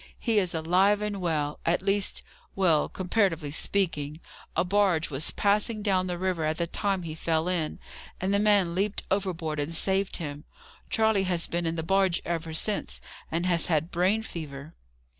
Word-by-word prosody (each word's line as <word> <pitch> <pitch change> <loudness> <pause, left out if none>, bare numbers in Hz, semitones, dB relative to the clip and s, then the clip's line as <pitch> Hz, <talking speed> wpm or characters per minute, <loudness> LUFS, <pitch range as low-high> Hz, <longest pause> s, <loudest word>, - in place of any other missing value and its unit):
"He 225 -3 +2
is 180 -3 -1
alive 185 +6 +3
and 205 -2 -3
well. 150 -4 -1
At 175 +2 +1
least, 200 0 +1 0.3
well, 170 -6 +3
comparatively 180 -6 0
speaking. 155 -3 -1 0.4
A - - +3
barge 180 -4 +2
was 140 +3 +2
passing 210 +1 +1
down 185 -3 +1
the 175 -1 -3
river 185 -2 -1
at 155 +1 0
the 170 - 0
time 195 +2 -1
he 160 -2 -5
fell 160 +1 0
in, 170 -4 -1 0.4
and 190 +2 0
the 200 - +3
man 205 -5 +3
leaped 195 +3 -1
overboard 175 -6 -1
and 150 +3 -2
saved 190 +3 +1
him. 150 -3 -6 0.5
Charley 220 -3 +2
has 175 -2 +2
been 170 0 -2
in 165 - -1
the 160 - -3
barge 190 0 +2
ever 165 -1 -3
since, 200 +6 -1 0.3
and 170 +2 0
has 175 -3 +3
had 160 0 0
brain 190 +6 +2
fever." 155 -5 -8
180 Hz, 175 wpm, -27 LUFS, 160-195 Hz, 0.5 s, alive